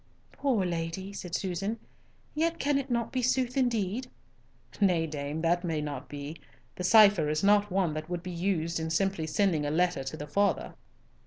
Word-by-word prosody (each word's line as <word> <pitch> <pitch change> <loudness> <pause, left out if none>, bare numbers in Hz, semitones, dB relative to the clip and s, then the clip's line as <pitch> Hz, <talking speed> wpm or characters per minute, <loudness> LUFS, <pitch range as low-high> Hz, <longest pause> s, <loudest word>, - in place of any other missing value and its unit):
"Poor 245 -9 0
lady," 175 +3 -3
said 180 -3 -5
Susan. 195 +4 -2 0.6
"Yet 330 +2 0
can 285 0 +1
it 275 0 -5
not 235 -2 -1
be 255 - -1
sooth 250 0 +1
indeed?" 240 -2 0 0.7
"Nay, 180 -5 +3
dame, 150 0 -4
that 175 +2 +2
may 165 -3 -1
not 145 -2 -5
be. 145 +2 -6 0.4
The 180 - -5
cipher 200 -6 +6
is 155 +3 -1
not 205 +1 +4
one 185 -4 +1
that 155 +2 -5
would 175 -1 -3
be 180 - -5
used 170 -2 -1
in 160 0 -3
simply 170 -1 0
sending 165 -2 +1
a 145 - -1
letter 175 -2 +1
to 135 +4 -5
the 150 - -6
father." 200 +7 0
180 Hz, 180 wpm, -29 LUFS, 160-205 Hz, 0.7 s, cipher